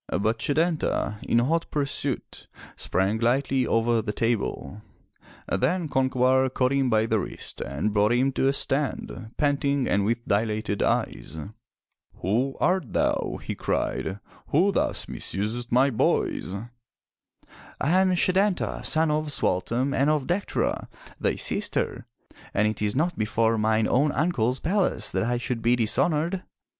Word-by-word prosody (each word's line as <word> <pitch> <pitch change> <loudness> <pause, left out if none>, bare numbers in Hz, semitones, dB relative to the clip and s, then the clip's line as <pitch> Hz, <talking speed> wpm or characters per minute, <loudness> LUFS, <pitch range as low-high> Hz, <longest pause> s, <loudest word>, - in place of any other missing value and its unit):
But 110 +5 0
Setanta, 155 - 0
in - - +1
hot 160 +8 +1
pursuit, 140 -2 -2 0.3
sprang 95 +4 0
lightly 130 +2 +1
over 115 0 +2
the 105 -1 -3
table. 105 - -2 0.7
Then 180 -1 0
Concobar 130 -1 +2
caught 125 0 +1
him 135 -2 +2
by 110 -1 +3
the 110 -1 +1
wrist - - -7
and 75 - -2
brought 105 +1 +3
him 130 +3 +2
to 135 - +1
a 135 - +3
stand, 135 -5 -1
panting 140 -2 +1
and 100 - +2
with 115 +3 -1
dilated 105 0 0
eyes. - - -1 0.8
"Who 125 +8 -1
art 180 - +1
thou,'* - - 0
he - - -3
cried, 95 +2 -2 0.3
"who 180 +8 +3
thus - - -1
misusest 115 +5 -3
my 130 +3 +4
boys?'* 110 -4 0 1.3
"I 145 - +1
am 190 -1 +3
Setanta, 185 +2 +1
son 160 0 +2
of 155 +1 0
Sualtam 125 +1 0
and 140 +1 +2
of 150 -3 +1
Dectera, 185 +3 -1 0.3
thy - - +1
sister, - - -1 0.5
and 105 - +3
it 110 - -3
is 105 -1 0
not 170 +5 0
before 110 +1 +1
mine 110 0 +2
own 140 +4 +2
Uncle's 130 -6 +1
palace 175 - 0
that 95 +2 0
I 120 +1 0
should 120 -1 -3
be 120 +2 +3
dishonored.'' 155 - +1
125 Hz, 140 wpm, -26 LUFS, 110-150 Hz, 1.3 s, my